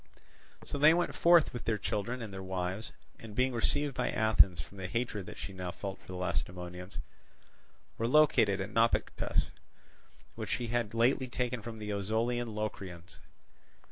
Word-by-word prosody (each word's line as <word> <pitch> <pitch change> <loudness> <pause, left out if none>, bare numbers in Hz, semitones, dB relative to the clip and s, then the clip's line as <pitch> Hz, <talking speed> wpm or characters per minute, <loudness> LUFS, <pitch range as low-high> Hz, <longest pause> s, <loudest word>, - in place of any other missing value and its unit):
So 145 - -4
they 155 +3 +7
went 175 0 0
forth 170 -2 +5
with 120 - -6
their 110 -2 +1
children 110 +5 -2
and 105 -3 -7
their 95 - -5
wives, 95 +2 -3 0.3
and 110 -2 -10
being 130 +1 +2
received 140 +4 +1
by - - -1
Athens 105 -5 +4
from 100 +4 -8
the 95 - -3
hatred 105 -2 -2
that - - -8
she 100 - -6
now 90 -1 -4
felt 95 +2 -6
for - - -22
the 90 - -6
Lacedaemonians, 90 0 -4 1.0
were 115 - +1
located 120 -8 +5
at 100 +2 -4
Naupactus, 115 +3 +1 0.8
which - - -6
she 120 -2 -1
had 115 -2 -1
lately 130 +3 +3
taken 125 -1 -2
from 115 +1 -7
the 105 -1 -5
Ozolian 110 +3 -1
Locrians. 95 -5 -5
110 Hz, 165 wpm, -32 LUFS, 95-120 Hz, 1.0 s, they